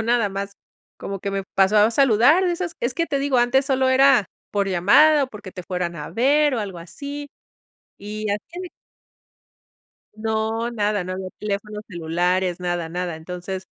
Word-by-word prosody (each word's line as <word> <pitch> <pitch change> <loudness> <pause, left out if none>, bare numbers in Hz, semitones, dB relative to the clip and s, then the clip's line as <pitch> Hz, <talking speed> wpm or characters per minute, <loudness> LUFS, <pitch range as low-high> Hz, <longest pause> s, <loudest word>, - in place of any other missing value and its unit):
Yo - - 0
nada 230 -2 +2
más 200 +1 -5 0.5
como 195 -1 -5
que 200 - -3
me 195 -1 -3
pasó 195 +2 +4
a 210 +2 +5
saludar, 275 - +5
de 360 - +2
esas 345 -1 -3
es 240 +1 0
que 335 +4 -1
te 280 -2 -1
digo, 275 -2 +1
antes 255 +3 +3
solo 265 -1 +2
era 260 -5 +5 0.2
por 200 -1 0
llamada, 275 - +5
o - - -7
porque 210 -5 -10
te 180 - -7
fueran 175 -1 -3
a 150 -3 -7
ver, 285 +4 +3
o - - -1
algo 195 -4 -5
así, 285 - -7 0.7
y 210 +1 -4
así. 340 - -5 1.5
No, 220 +1 -1
nada. 210 -4 -1
No 185 - -4
había 185 0 -5
teléfonos 210 0 -4
celulares, 175 +1 -1
nada, 175 -2 -2
nada. 175 -1 -3
Entonces, 180 +3 -6
210 Hz, 175 wpm, -22 LUFS, 185-260 Hz, 1.5 s, a